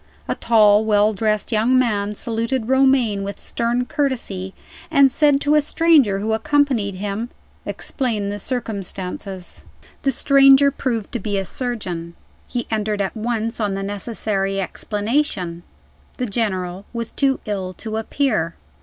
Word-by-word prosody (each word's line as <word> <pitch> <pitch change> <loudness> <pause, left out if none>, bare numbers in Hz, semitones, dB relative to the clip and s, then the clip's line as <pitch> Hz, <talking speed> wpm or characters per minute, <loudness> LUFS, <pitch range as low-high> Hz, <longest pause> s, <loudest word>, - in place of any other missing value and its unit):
A - - 0
tall, 215 -2 +4
well 210 0 +3
dressed 215 +1 0
young 230 +4 +3
man 210 -4 +1
saluted 230 +2 -1
Romayne 265 -6 +3
with 200 0 -5
stern 240 +1 -1
courtesy, 230 -10 -2 0.3
and 275 -1 +5
said 290 -1 +4
to 290 - +2
a 300 - +5
stranger 295 -9 +4
who 215 +3 -1
accompanied 255 -5 +1
him: 205 +4 -3 0.4
"Explain 220 -7 -2
the 205 0 -4
circumstances." 195 -5 -4 0.4
The 275 - +1
stranger 275 +1 +6
proved 235 -6 -3
to 240 - -2
be 205 0 -2
a 195 - -1
surgeon. 180 -9 -4 0.3
He 245 -1 -3
entered 215 -1 -1
at 195 +2 -2
once 230 0 -2
on 205 -3 0
the 195 - -3
necessary 200 -1 -2
explanation. 205 - -2 0.6
The 250 - -1
General 190 -5 -2
was 230 -1 -4
too 270 -1 +1
ill 195 -3 -3
to 220 +3 -5
appear. 220 - 0
220 Hz, 140 wpm, -21 LUFS, 200-255 Hz, 0.6 s, stranger